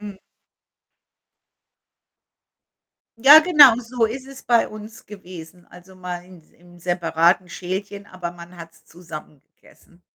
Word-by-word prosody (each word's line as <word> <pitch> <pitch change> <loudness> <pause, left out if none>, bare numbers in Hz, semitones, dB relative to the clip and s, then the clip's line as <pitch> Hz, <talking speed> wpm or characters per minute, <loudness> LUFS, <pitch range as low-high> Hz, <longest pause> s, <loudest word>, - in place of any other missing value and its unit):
Mhm. 205 -2 -10 3.0
Ja, 285 +6 +8
genau, 300 -8 +6
so 240 -1 -2
ist 255 +4 -7
es 270 0 -13
bei 235 -1 +1
uns 215 +1 -13
gewesen. 180 -3 -13
Also, 180 +1 -17
mal 180 -1 -8
ins 180 -4 -19
im 175 0 -21
separaten 175 +1 0
Schälchen, 195 +3 -7
aber 180 -2 -7
man 175 +1 -14
hat's 165 -1 -14
zusammen 155 -4 -12 0.2
gegessen. 175 0 -25
185 Hz, 120 wpm, -21 LUFS, 175-215 Hz, 3.0 s, Ja